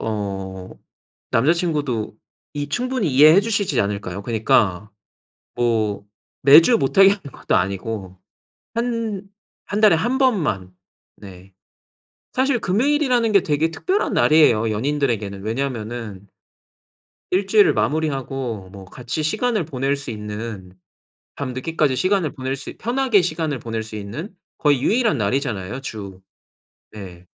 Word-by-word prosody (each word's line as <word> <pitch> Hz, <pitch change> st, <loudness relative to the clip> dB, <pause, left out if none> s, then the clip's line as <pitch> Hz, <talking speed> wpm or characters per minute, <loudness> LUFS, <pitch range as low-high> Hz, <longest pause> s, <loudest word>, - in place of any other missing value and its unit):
어 95 Hz, -3 st, -4 dB, 0.6 s
남자친구도 145 Hz, -6 st, 0 dB, 0.4 s
이 145 Hz, 0 st, -3 dB
충분히 250 Hz, -, -1 dB
이해해 155 Hz, +7 st, +7 dB
주시지 200 Hz, -, 0 dB
않을까요? 100 Hz, -1 st, -3 dB
그니까 105 Hz, -3 st, +1 dB, 0.7 s
뭐 110 Hz, -4 st, 0 dB, 0.4 s
매주 160 Hz, -, +7 dB
못 135 Hz, -, -2 dB
하게 195 Hz, 0 st, +9 dB
하는 200 Hz, 0 st, -1 dB
것도 -, -, -2 dB
아니고 95 Hz, 0 st, -2 dB, 0.6 s
한 230 Hz, -4 st, -3 dB, 0.4 s
1 205 Hz, -, -3 dB
달에 210 Hz, -6 st, +6 dB
1 240 Hz, +11 st, 0 dB
번만. 150 Hz, -, 0 dB, 0.4 s
네. 95 Hz, -1 st, -14 dB, 0.8 s
사실 260 Hz, 0 st, +1 dB
금요일이라는 245 Hz, +3 st, +1 dB
게 200 Hz, -, +6 dB
되게 155 Hz, +1 st, 0 dB
특별한 375 Hz, -, -1 dB
날이에요, 120 Hz, -8 st, +4 dB
연인들에게는. 110 Hz, -4 st, -1 dB
왜냐하면은 115 Hz, -4 st, -4 dB, 1.0 s
1 370 Hz, -, +1 dB
주일을 420 Hz, -2 st, +5 dB
마무리하고 135 Hz, -9 st, -2 dB
뭐 100 Hz, -1 st, -11 dB
같이 125 Hz, +9 st, -5 dB
시간을 215 Hz, +4 st, 0 dB
보낼 140 Hz, -2 st, -1 dB
수 140 Hz, -4 st, -6 dB
있는 105 Hz, -3 st, -7 dB, 0.6 s
밤늦게까지 140 Hz, +2 st, -1 dB
시간을 185 Hz, +2 st, +1 dB
보낼 130 Hz, -2 st, -3 dB
수 140 Hz, -, -9 dB
편하게 245 Hz, -3 st, +2 dB
시간을 155 Hz, -5 st, -2 dB
보낼 115 Hz, 0 st, -4 dB
수 110 Hz, 0 st, -9 dB
있는 110 Hz, -, -7 dB, 0.3 s
거의 145 Hz, -4 st, +2 dB
유일한 225 Hz, -, +2 dB
날이잖아요 115 Hz, -1 st, -2 dB
주. 100 Hz, -7 st, -8 dB, 0.7 s
네. 90 Hz, -4 st, -11 dB
135 Hz, 270 characters per minute, -21 LUFS, -, 1.0 s, 하게